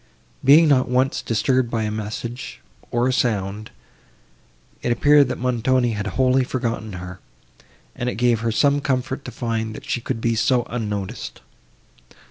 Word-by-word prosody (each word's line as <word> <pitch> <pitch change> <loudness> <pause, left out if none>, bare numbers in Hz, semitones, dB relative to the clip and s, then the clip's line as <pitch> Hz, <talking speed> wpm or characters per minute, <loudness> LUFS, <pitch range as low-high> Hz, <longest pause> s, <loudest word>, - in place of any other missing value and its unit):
Being 155 +4 +7
not 130 -4 +3
once 130 +1 +1
disturbed 125 +2 +1
by 115 -2 -1
a 105 - -2
message, 110 +3 -5 0.3
or 120 +1 +1
a 130 - +1
sound, 105 -3 -1 1.1
it 120 - -1
appeared, 145 +3 +5
that - - -3
Montoni 125 0 +1
had 105 -1 -3
wholly 130 0 +3
forgotten 115 -4 -3
her, 90 0 -8 0.8
and 125 -1 -2
it - - -4
gave 120 -1 +2
her 115 0 -1
some 145 +5 +2
comfort 130 0 -2
to - - -6
find, 110 -2 -3
that - - -10
she 120 - -1
could 115 - -3
be 115 +1 +1
so 120 +2 +2
unnoticed. 105 -2 -4
120 Hz, 155 wpm, -22 LUFS, 110-130 Hz, 1.1 s, Being